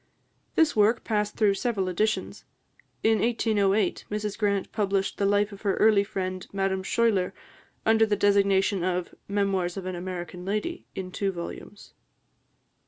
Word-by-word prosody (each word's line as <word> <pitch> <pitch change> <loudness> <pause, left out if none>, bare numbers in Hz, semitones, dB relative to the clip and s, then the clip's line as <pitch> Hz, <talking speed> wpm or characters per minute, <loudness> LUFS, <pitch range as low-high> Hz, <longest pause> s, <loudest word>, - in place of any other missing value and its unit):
This 320 -2 +3
work 215 +2 +3
passed 210 -2 -1
through 210 -3 +4
several 195 -2 -1
editions. 215 +4 -1 0.6
In 220 -1 +4
1808, 210 -4 +1
Mrs 210 -1 -3
Grant 200 -3 0
published 200 -2 -1
the 200 - +2
life 205 +1 +2
of 200 - -11
her 200 -2 +1
early 215 -2 +5
friend, 185 -2 -4
Madame 195 -1 -1
Schuyler, 200 -3 +1 0.5
under 220 0 +4
the 210 - +2
designation 200 -1 +3
of 180 -1 -1
"Memoirs 195 -3 0
of 190 - -5
an 185 - -3
American 180 0 -6
Lady," 215 - -3
in 185 -1 -5
two 195 +1 -1
volumes. 175 +3 -9
200 Hz, 145 wpm, -26 LUFS, 190-215 Hz, 0.6 s, early